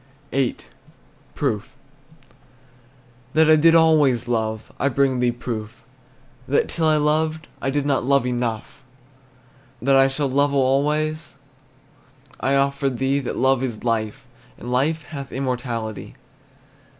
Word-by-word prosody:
VIII. 135 -2 0 0.8
PROOF. - - -3 1.6
That 155 0 +5
I - - +8
did 165 +2 +5
always 150 -7 +4
love, 110 -2 -2
I 140 - +2
bring 135 -1 +1
thee 125 -1 +2
proof: 120 0 -6 0.6
That 140 - +2
till 165 -2 0
I 155 -1 +4
loved 155 +1 0
I 135 - -1
did 140 +1 -1
not 140 -2 +1
love 140 0 +2
enough. 120 0 -3 1.0
That 135 +3 +2
I 135 0 +6
shall 135 +1 0
love 140 +2 +1
alway, 145 +4 +1 1.2
I 135 +2 +1
offer 140 0 +1
thee 135 +2 0
That 135 - -4
love 130 0 +2
is 120 -5 -4
life, 115 +2 -2 0.3
And 120 - -7
life 150 +5 0
hath 140 -3 -8
immortality. 120 -5 -4
135 Hz, 125 wpm, -22 LUFS, 120-145 Hz, 1.6 s, I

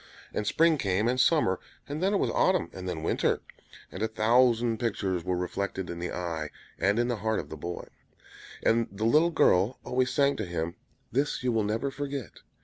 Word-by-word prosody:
And 105 - -2
spring 165 -2 +3
came, 100 +1 +1
and 125 +1 +1
summer; 130 - +3 0.3
and 145 +3 -4
then 190 +2 +2
it 205 - +2
was - - 0
autumn, 185 -3 +2
and 95 0 -5
then 80 -3 -4
winter; - - +1 0.5
and - - -7
a 110 - +2
thousand 115 +1 +3
pictures 95 -6 -1
were 90 0 -1
reflected 95 +1 -3
in 85 - -6
the 90 - -3
eye 80 -3 -3 0.3
and 100 +4 +2
in 120 0 +2
the 120 -2 -1
heart 110 +2 0
of 75 - -7
the - - -6
boy; 85 +3 -6 0.8
and 115 0 +3
the 105 +2 -3
little 155 +8 +5
girl 115 - +3
always 130 0 +1
sang 140 0 +2
to 110 - -2
him, 85 0 -3 0.4
"This 140 +1 0
you 125 - +2
will 110 -2 +1
never 115 +7 -1
forget." 140 - -5
110 Hz, 200 wpm, -28 LUFS, 90-130 Hz, 0.8 s, little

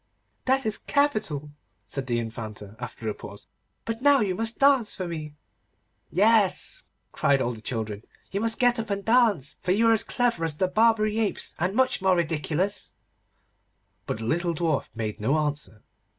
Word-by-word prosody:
'That 265 +1 +2
is 215 -2 +1
capital,' 215 - 0 0.3
said 135 -2 -5
the 120 -1 0
Infanta, 110 -3 -6
after 120 -2 -7
a 105 - 0
pause; - - -11 0.4
'but 225 +1 -4
now 285 0 +6
you 200 -5 +1
must 225 +4 0
dance 275 -5 +4
for 185 - -4
me.' 155 -3 -6 0.7
'Yes,' 210 - +3 0.3
cried 140 -1 +2
all 120 -2 0
the 110 -2 -8
children, 110 -3 -4 0.3
'you 200 - -2
must 225 0 +1
get 245 -1 +3
up 225 -1 -4
and 200 -1 -3
dance, 225 - +3
for 180 - 0
you 225 +4 +2
are 225 - +6
as 220 - +2
clever 240 -9 0
as 160 -2 -1
the 185 +4 +1
Barbary 215 +1 +2
apes, 215 -3 0
and 180 +4 0
much 260 -3 +2
more 190 -1 +4
ridiculous.' 170 +3 -1 1.1
But - - -2
the 110 - -6
little 170 +5 0
Dwarf 160 -3 0
made 110 -2 -4
no 130 +9 +1
answer. 150 -7 -3
180 Hz, 175 wpm, -26 LUFS, 140-225 Hz, 1.1 s, now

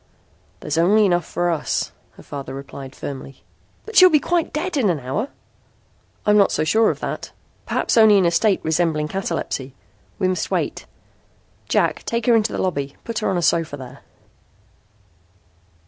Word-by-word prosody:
"There's 150 +2 -1
only 205 +5 +4
enough 175 -4 +1
for 175 0 -1
us," 155 -3 -2 0.2
her - - -15
father 140 -1 -7
replied 135 -1 -9
firmly. 135 -1 -8 0.4
"But 445 - -9
she'll 370 -3 +9
be 305 -3 +4
quite 340 +2 0
dead 340 +3 -3
in 245 -8 +2
an 165 -4 0
hour!" 135 - -3 1.0
"I'm 210 0 +5
not 200 - +4
so - - 0
sure 220 +8 +3
of - - -3
that. - - -5 0.4
Perhaps - - 0
only 220 -2 +7
in 190 - +3
a 170 - +3
state 195 +3 +2
resembling 160 -2 0
catalepsy. 160 -8 -3 0.4
We 185 - +1
must 185 0 -1
wait. - - -2 0.8
Jack, - - +1
take 235 -1 -2
her 240 - +5
into 220 0 +2
the - - -3
lobby. 140 -7 -2
Put 230 -2 -3
her - - -1
on 190 - 0
a 175 - -1
sofa 165 -4 +1
there." 130 -2 -10
175 Hz, 170 wpm, -21 LUFS, 150-220 Hz, 1.0 s, she'll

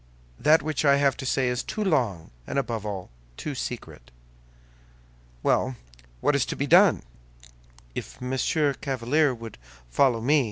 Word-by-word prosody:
That 155 -1 +4
which 155 -1 -1
I 140 -1 +5
have 140 -1 +2
to 130 - -5
say 130 0 +1
is 125 0 0
too 215 - -3
long, 120 - 0 0.2
and - - -3
above 115 -6 -2
all, 95 -7 -5 0.3
too 150 - -4
secret." 120 - -6 1.3
"Well, 130 0 +1 0.5
what 145 - +2
is 140 - +3
to - - -3
be 140 - -1
done?" 180 +5 +5 0.9
"If - - -7
Monsieur 135 +3 0
Chevalier 135 +2 +1
would 115 -2 -10 0.3
follow 125 - +3
me?" 145 +7 +3
135 Hz, 150 wpm, -26 LUFS, 120-150 Hz, 1.3 s, I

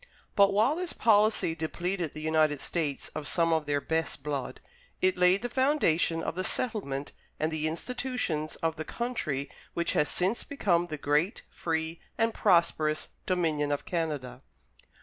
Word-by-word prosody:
But 200 -1 +6
while 220 +9 +3
this 355 0 0
policy 210 -5 +3
depleted 170 +1 -2
the 155 - -5
United 155 -2 +2
States 150 -4 -2
of 145 - -6
some 165 -1 +2
of 160 -2 0
their 145 -1 +1
best 160 -1 -2
blood, 145 -3 -3 0.4
it 185 0 +3
laid 180 +3 +4
the - - 0
foundation 240 - +2
of - - -2
the 185 +2 -2
settlement 165 - -1 0.3
and 155 +1 0
the 155 0 0
institutions 170 - -2
of 165 -1 0
the 155 - -3
country 155 - -2 0.3
which 170 0 0
has 150 - +2
since 190 +6 0
become 175 -11 +1
the 155 -2 -4
great, 150 +7 +1
free, 160 0 -2 0.2
and 225 0 +2
prosperous 155 -5 +2 0.2
Dominion 160 -5 +1
of 145 - -2
Canada. 155 -7 -3
165 Hz, 155 wpm, -29 LUFS, 155-195 Hz, 0.4 s, But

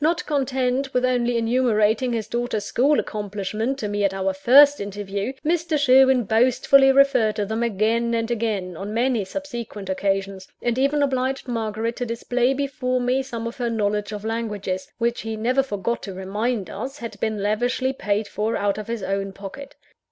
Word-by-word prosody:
Not 335 +2 +1
content 265 -2 -1
with 250 0 +3
only 245 -1 +1
enumerating 230 0 +2
his 225 -3 -2
daughter's 235 -3 -2
school 275 +7 +2
accomplishments 210 +5 -3
to 210 - -2
me 205 0 -1
at 195 -1 +1
our 190 0 0
first 280 +8 +6
interview, 200 +3 -4
Mr. 330 -1 +1
Sherwin 265 -2 +5
boastfully 255 +5 +4
referred 265 -6 +4
to 210 - -1
them 220 +3 -3
again 230 +1 +1
and 230 +1 -1
again, 210 -6 -2
on 200 +5 -6
many 240 -2 +1
subsequent 235 -4 -6
occasions; 195 0 -2
and 240 +1 -1
even 285 +2 +2
obliged 265 -1 -1
Margaret 225 -1 -2
to 245 - -3
display 245 +3 0
before 260 -2 -1
me, 250 +2 +1
some 235 -4 -6
of 230 - -5
her 240 -2 -1
knowledge 210 -2 -1
of 210 0 -6
languages 210 -5 -3
which 235 0 -1
he 225 0 -4
never 250 +5 +2
forgot 235 -2 -3
to 195 -3 -7
remind 205 +2 -2
us 260 +7 -6
had 230 -6 -8
been 215 -2 -2
lavishly 245 +5 0
paid 210 -4 -1
for 220 +2 -2
out 205 +1 0
of 215 - -7
his 230 -3 -4
own 195 0 -2
pocket. 205 +9 -9
230 Hz, 175 wpm, -23 LUFS, 205-255 Hz, -, first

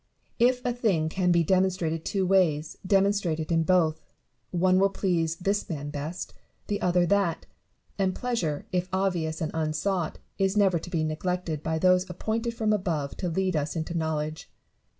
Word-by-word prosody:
If 250 +1 +3
a 245 - +1
thing 195 -10 +1
can 180 +1 +1
be 170 -1 +4
demonstrated 180 -2 +1
two 195 -2 0
ways, 170 -5 +2
demonstrate 195 -3 +2
it 160 +1 -4
in 165 -1 +3
both: 165 -2 +2 0.5
one 185 +1 +3
will 195 +1 +4
please 170 -5 0
this 195 +4 -1
man 145 -3 -4
best, 150 +4 -5 0.3
the 205 0 -2
other 180 -1 +3
that; 175 -3 +1 0.5
and 190 -1 +1
pleasure, 195 - -2
if 180 0 -1
obvious 180 -4 -1
and 160 - -1
unsought, 160 +3 -1 0.2
is 195 +1 +1
never 190 -4 +4
to 170 - -9
be 165 -3 0
neglected 160 0 -2
by 160 0 -1
those 185 +2 +3
appointed 225 +6 -2
from 220 -2 +1
above 165 -8 -1
to 180 - -2
lead 185 +1 0
us 150 +1 -1
into 165 +1 -3
knowledge. 155 -1 -2
180 Hz, 170 wpm, -27 LUFS, 160-195 Hz, 0.5 s, be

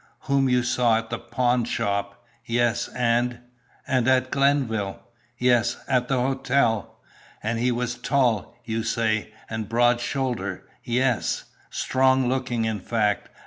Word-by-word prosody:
"Whom 135 -1 +2
you 125 -1 +3
saw 120 -2 +2
at 115 0 -5
the - - -2
pawnshop?" 105 -5 -1 0.2
"Yes. 120 0 +1
And 120 0 +1 0.3
" - - -33
"And 130 -3 +1
at 130 0 +3
Glenville?" 125 -9 +1 0.4
"Yes, 120 -1 +2
at 125 -2 +1
the 130 -1 +1
hotel." 130 -3 0 0.5
"And 115 +2 -1
he 125 +1 +2
was 120 0 -1
tall, 120 -7 0
you 115 0 -2
say, 110 -1 0 0.2
and 110 -2 -4
broad 120 +1 +3
shouldered?" 120 -8 -2 0.2
"Yes." 125 -1 0 0.3
"Strong 130 0 +2
looking, 125 -3 -1
in 110 -2 -1
fact. 105 -1 0
120 Hz, 135 wpm, -24 LUFS, 110-130 Hz, 0.5 s, you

